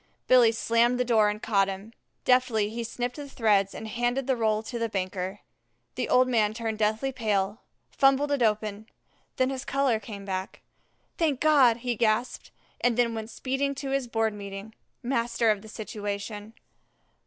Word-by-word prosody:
Billy 245 -3 +6
slammed 230 +2 +2
the 250 - +2
door 220 -3 +4
and 210 +1 -5
caught 195 -3 +2
him. 195 +3 -7 0.3
Deftly 235 -5 +3
he 235 +1 -4
snipped 245 +3 -4
the 290 -1 -7
threads 205 -6 +2
and 220 - -6
handed 240 +4 -1
the 265 -1 +1
roll 220 -2 +1
to 235 +1 -5
the 230 0 -1
banker. 190 0 -3 0.5
The - - -3
old 255 0 +5
man 220 -4 +1
turned 225 -2 -3
deathly 220 +5 +1
pale, 210 -4 -1 0.3
fumbled 275 +1 +3
it 285 -3 +1
open, 215 -1 0 0.5
then 255 +1 +2
his 265 0 -4
color 275 -4 +1
came 200 -1 -9
back. 190 -1 -4 0.6
"Thank 300 -6 +1
God!" 275 -7 +5
he 245 -1 0
gasped, 225 +2 0 0.3
and 245 -1 +2
then 235 -1 +2
went 220 0 -5
speeding 275 +3 -2
to 275 0 -4
his 270 -2 0
Board 225 -2 0
meeting, 200 +1 -8 0.3
master 235 -2 +1
of 205 -2 -2
the 220 - -12
situation. 205 0 -6
225 Hz, 170 wpm, -27 LUFS, 210-250 Hz, 0.6 s, Billy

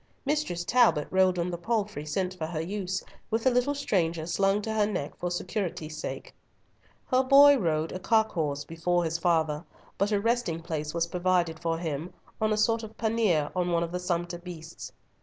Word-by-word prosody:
Mistress 275 - -1
Talbot 230 -7 +4
rode 185 -1 +3
on 175 +1 -1
the 175 - -4
palfrey 205 -6 -2
sent 185 +4 -1
for 165 -4 -4
her 160 -1 -4
use, 190 +2 -3 0.3
with 225 +1 0
the 260 - +4
little 250 +4 +1
stranger 170 - 0
slung 195 +4 +2
to 220 - -2
her 210 -1 +2
neck 180 -9 -3
for 180 - -3
security's 175 -3 -3
sake. 155 - -6 0.7
Her 255 0 +3
boy 280 +2 +8
rode 160 -4 0
"a 185 - -5
cock 220 +3 +2
horse" 145 -4 -2
before 175 +2 0
his 165 0 -1
father, 160 -3 +1 0.4
but 200 +2 +1
a 205 - +2
resting 230 -6 0
place 155 -2 -4
was 170 0 +2
provided 175 -2 0
for 165 -1 -1
him 160 0 -4 0.3
on 215 0 +2
a 215 - +1
sort 225 +1 +2
of 220 -1 -10
pannier 215 -10 +1
on 180 -1 0
one 170 0 +2
of 170 - -4
the 180 - -2
sumpter 175 -1 -2
beasts. 170 -2 -9
180 Hz, 195 wpm, -28 LUFS, 165-215 Hz, 0.7 s, boy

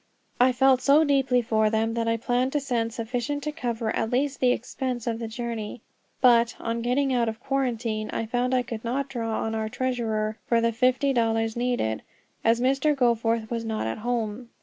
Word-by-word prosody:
I 250 +1 +5
felt 260 +1 +4
so 290 +3 +5
deeply 270 -4 +2
for 220 -1 +2
them 225 +1 0
that 230 0 -1
I 230 0 +2
planned 245 +3 0
to 295 - +2
send 240 -4 -1
sufficient 245 +6 -3
to 300 - -2
cover 235 -7 -2
at 225 - -1
least 270 +3 0
the 250 -1 +4
expense 250 0 -3
of 230 -1 -2
the 230 - -4
journey. 230 -1 -5 0.4
But, 235 -2 +5
on 230 0 -2
getting 260 +3 +1
out 235 -2 +2
of 220 0 -6
quarantine, 235 -5 -2
I 225 - -2
found 245 +3 0
I 250 - +2
could 230 -2 -6
not 265 +4 -2
draw 230 -4 -2
on 225 - -2
our 220 -1 -2
treasurer 225 -3 -2
for 235 - +3
the 230 0 +2
fifty 255 +4 +2
dollars 225 -2 +1
needed, 240 - -1 0.4
as 230 +1 +3
Mr. 275 +4 +2
Goforth 230 -3 +1
was 230 -1 -2
not 220 - -2
at 110 - -3
home. 235 0 -3
235 Hz, 195 wpm, -26 LUFS, 225-255 Hz, 0.4 s, I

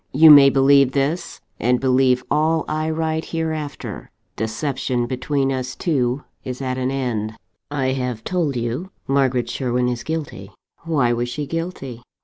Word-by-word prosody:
You 155 +3 +8
may 140 -2 +9
believe 135 0 +4
this, 155 +5 -1 0.2
and 125 +2 +2
believe 130 -1 +3
all 160 +1 +2
I 155 +1 -1
write 160 0 -1
hereafter. 155 -3 -4 0.3
Deception 120 +2 -2
between 135 +2 -1
us 130 0 -3
two 135 -4 0 0.2
is 125 -1 -5
at 130 -1 -2
an 130 0 0
end. 120 -5 -2 0.3
"I 135 -3 -1
have 125 -4 -3
told 165 -5 -1
you 120 +10 -3 0.2
Margaret 135 -3 +1
Sherwin 125 -1 -1
is 120 -1 -2
guilty. 155 -11 -5 0.4
Why 140 -8 +2
was 120 +1 -2
she 145 +4 -4
guilty? 155 -7 -5
135 Hz, 145 wpm, -21 LUFS, 125-155 Hz, 0.4 s, may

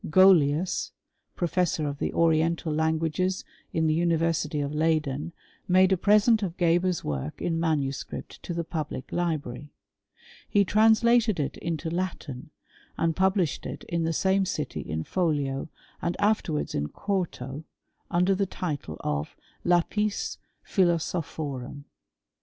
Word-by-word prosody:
Golius, 175 -2 +4 0.4
professor 170 -3 0
of 140 0 -4
the - - -1
oriental 165 0 +2
languages 160 +4 0 0.3
in 160 -1 +1
the 155 - +3
University 165 -2 +1
of 145 0 -2
Leyden, 155 -1 0 0.4
made 185 +1 +5
a - - +5
present 210 +4 +4
of 185 -4 -3
Geber's 175 0 +2
work 70 0 -4
in 165 -1 -1
manuscript 145 -5 -2
to 175 - -5
the 170 - -1
public 155 -5 -5
library. 150 -6 -2 0.8
He 200 -1 +4
translated 220 0 +4
it 145 - -1
into 165 -1 -3
Latin, 165 -6 -4 0.5
and 165 -1 +1
published 190 -4 +1
it 135 - -7
in 170 -1 -2
the 165 - +1
same 190 +4 +2
city 190 - -3
in 80 +1 -3
folio^ 145 - -1 0.3
and 170 0 -1
afterwards 200 -7 +1
in 75 - -1
quarto, 160 - -3 0.5
under 180 +2 +3
the 195 +1 0
title 145 - -4
of 75 0 -2
*^ - - -35 0.2
Lapis 200 +4 +1 0.3
Philosophorum." 155 - -1
165 Hz, 130 wpm, -27 LUFS, 150-185 Hz, 0.8 s, made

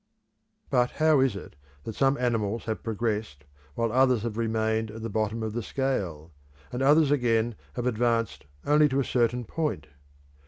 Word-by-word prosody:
But 125 0 +3
how 155 -2 +4
is 130 -5 +2
it 95 - -9 0.3
that 115 - -5
some 135 +4 +2
animals 115 -3 -1
have 110 -1 -3
progressed 110 -8 -3 0.3
while 115 -1 0
others 130 -2 +3
have 115 -3 -3
remained 110 -1 0
at 110 +1 -8
the 115 - -4
bottom 110 +2 -1
of 110 -1 -3
the 120 - -2
scale, 95 - -3 0.4
and 125 - -3
others 145 +2 +5
again 120 -4 +2 0.2
have 120 - -4
advanced 115 - 0 0.2
only 150 +1 +4
to 135 0 0
a - - +2
certain 120 0 0
point? 150 - -3
115 Hz, 165 wpm, -27 LUFS, 110-130 Hz, 0.4 s, others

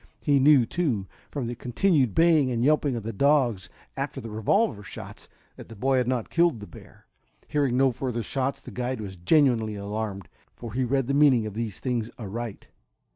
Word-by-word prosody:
He 145 -2 +2
knew, 135 -2 +6
too, 125 - -1 0.2
from 140 -4 -4
the 120 - -3
continued 130 - +1
baying 165 -5 +4
and 120 0 0
yelping 150 -3 +2
of 115 - -4
the 115 +1 -4
dogs, 120 -7 +2 0.3
after - - -4
the 115 - -8
revolver 110 - +1
shots, 105 - -10 0.3
that - - -11
the 115 - -10
boy 130 +5 +1
had 125 -2 +1
not 125 -3 -2
killed 170 -7 +2
the 105 - -8
bear. 85 - -15 0.4
Hearing 140 -4 0
no 135 0 +4
further 120 -1 -3
shots 135 +4 -2
the - - -11
guide 125 0 -3
was 100 -3 -7
genuinely 110 - +2
alarmed, 100 -1 -5 0.3
for 115 -3 -8
he 130 +2 0
read 135 +1 0
the 140 - -1
meaning 140 -6 +4
of 105 - -5
these 110 -2 -4
things 120 -3 -2
aright. 115 0 -6
125 Hz, 190 wpm, -26 LUFS, 110-140 Hz, 0.4 s, knew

